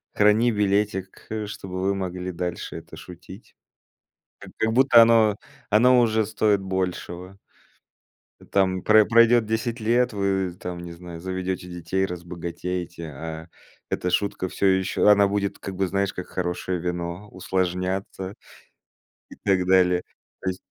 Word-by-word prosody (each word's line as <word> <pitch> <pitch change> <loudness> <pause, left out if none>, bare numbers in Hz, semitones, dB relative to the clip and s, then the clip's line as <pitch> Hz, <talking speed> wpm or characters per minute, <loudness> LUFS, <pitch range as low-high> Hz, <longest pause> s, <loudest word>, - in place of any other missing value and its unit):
храни 105 +3 +4
билетик, 100 -2 -1
э, 110 -1 -3
чтобы 95 -3 -6
вы 100 +1 +1
могли 90 -1 -4
дальше 90 0 -5
это - - -11
шутить. 95 +4 -12 0.9
Как - - -12
как 110 0 +1
будто 125 -1 +7
оно 115 -2 +4 0.3
оно 125 +4 +5
уже 110 -2 +2
стоит 105 -2 +1
большего. 95 0 -4 1.2
Там 95 -2 +2
про 110 0 +6
пройдёт 115 0 +5
10 110 +2 -2
лет, 120 +3 +2
вы 95 -3 0
там, 90 -1 -5
не 85 0 -8
знаю, 85 0 -9
заведёте 95 0 -3
детей, 90 +2 -2
разбогатеете, 85 -1 -5
а 80 +2 -7 0.4
эта 90 - -1
шутка 95 0 -1
всё 100 - -2
ещё 95 +1 +2
она 100 -1 +6
будет 100 0 -2
как 95 - -6
бы, 95 +1 0
знаешь, 100 +2 -1
как 90 - -6
хорошее 90 0 -3
вино, 90 +3 -4
усложняться 95 +1 -2 1.0
и - - -12
так 95 -2 +2
далее. 90 -1 +3 0.4
То 95 - -1
есть 90 - -4
95 Hz, 140 wpm, -24 LUFS, 90-105 Hz, 1.2 s, будто